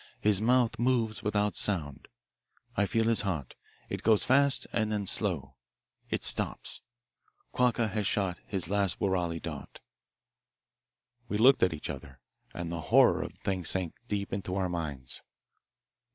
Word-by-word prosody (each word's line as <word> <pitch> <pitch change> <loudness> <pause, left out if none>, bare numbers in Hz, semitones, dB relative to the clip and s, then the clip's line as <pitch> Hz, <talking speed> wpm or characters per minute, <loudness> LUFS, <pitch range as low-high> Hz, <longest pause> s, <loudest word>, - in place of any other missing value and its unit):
His 105 -2 +3
mouth 120 0 +2
moves 120 -3 +1
without 105 -1 0
sound. 80 -9 +1 0.7
I 100 0 +1
feel 115 +2 +1
his 115 -1 +3
heart. 80 -10 -3 0.3
It - - -5
goes 110 -2 +4
fast 140 +1 +4
and 110 0 0
then 105 -2 -2
slow. 75 - 0 0.5
It - - -2
stops. - - +2 0.7
Quacca 120 -2 +1
has 105 -2 -2
shot 95 -4 0
his 95 -4 -1
last 100 0 0
woorali 90 -4 -1
dart.'" 75 -4 -8 1.5
We 105 - -2
looked 130 +5 +5
at 95 - +4
each 80 -2 -6
other, 70 -1 -11 0.3
and 85 -1 -6
the 85 -1 -4
horror - - +4
of - - -6
the - - -28
thing 95 -2 -2
sank 90 0 -1
deep 100 -3 -3
into 95 -2 -3
our 95 -2 -1
minds. 75 -7 -4
100 Hz, 150 wpm, -29 LUFS, 85-110 Hz, 1.5 s, looked